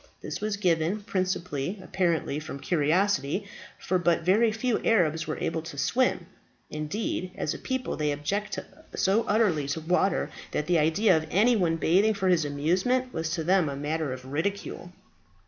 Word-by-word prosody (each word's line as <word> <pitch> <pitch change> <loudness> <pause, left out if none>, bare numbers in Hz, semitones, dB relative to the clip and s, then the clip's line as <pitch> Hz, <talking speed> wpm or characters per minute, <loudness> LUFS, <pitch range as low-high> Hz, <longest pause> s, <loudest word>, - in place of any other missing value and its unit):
This - - -6
was 210 -1 -1
given, 175 +1 +1
principally 185 -4 -2
apparently 170 -6 -1
from 155 -2 -7
curiosity, 175 +3 +1 0.3
for 185 - 0
but 170 -1 +2
very 215 +6 +4
few 225 +2 -1
Arabs 160 -7 +2
were 155 - -3
able 165 0 -2
to 155 -3 -9
swim; 250 - +1 0.5
indeed, 180 +4 -3
as 150 - -2
a - - -7
people 260 -1 -3
they 150 -1 0
object 160 +9 -2 0.4
so 195 +4 +2
utterly 200 -10 +2
to 145 +3 -2
water, 180 +4 +1 0.2
that 150 - -1
the 175 -1 +3
idea 165 +8 +3
of 160 0 -1
any 220 +9 +4
one 175 -6 +2
bathing 190 +7 +3
for 190 -1 0
his 170 -4 +3
amusement 185 - 0
was 160 0 -2
to 165 0 -2
them 180 -2 +3
a 140 - -4
matter 150 +1 -2
of 130 0 -7
ridicule. 175 +5 -3
175 Hz, 165 wpm, -27 LUFS, 155-200 Hz, 0.5 s, very